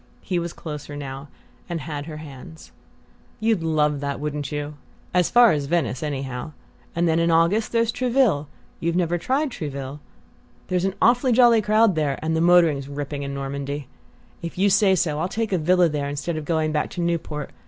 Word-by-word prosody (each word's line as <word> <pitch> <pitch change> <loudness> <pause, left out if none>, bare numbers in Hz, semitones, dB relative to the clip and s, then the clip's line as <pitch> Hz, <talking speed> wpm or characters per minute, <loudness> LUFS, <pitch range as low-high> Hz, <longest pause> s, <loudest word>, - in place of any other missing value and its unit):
He 180 -2 -1
was 170 0 -4
closer 150 -3 -7
now, 140 0 -7 0.4
and 170 -1 -2
had 145 0 -5
her 155 -2 -7
hands. 155 +2 -11 0.7
"You'd 220 -4 +1
love 150 -3 +1
that, 140 -1 -3
wouldn't 145 -1 -3
you? 145 0 -4 0.4
As 180 -1 +3
far 240 -1 +6
as 145 -2 -1
Venice, 140 -7 0
anyhow; 135 0 -4 0.4
and 170 +1 +2
then 165 0 +2
in 170 0 +2
August 170 +7 +3
there's 230 -1 +2
Trouville 245 - +1 0.3
you've 170 +1 -1
never 175 -1 +1
tried 270 - 0
Trouville? 140 - -5 0.7
There's 180 0 +1
an 195 0 -1
awfully 245 +2 +4
jolly 235 -2 +6
crowd 215 0 +4
there 150 -4 0
and 160 0 0
the 160 - +1
motoring's 165 -5 +4
ripping 145 0 -4
in 140 0 -4
Normandy. 140 0 -4 0.5
If 170 +1 -6
you 200 +2 +3
say 195 -1 +5
so 155 -4 0
I'll 180 - 0
take 220 +1 -2
a 185 - +1
villa 180 +2 +4
there 145 -2 -2
instead 145 +4 -3
of 155 -1 -4
going 160 0 0
back 150 -1 -1
to 175 - -5
Newport. 160 -4 -2
160 Hz, 185 wpm, -23 LUFS, 145-185 Hz, 0.7 s, far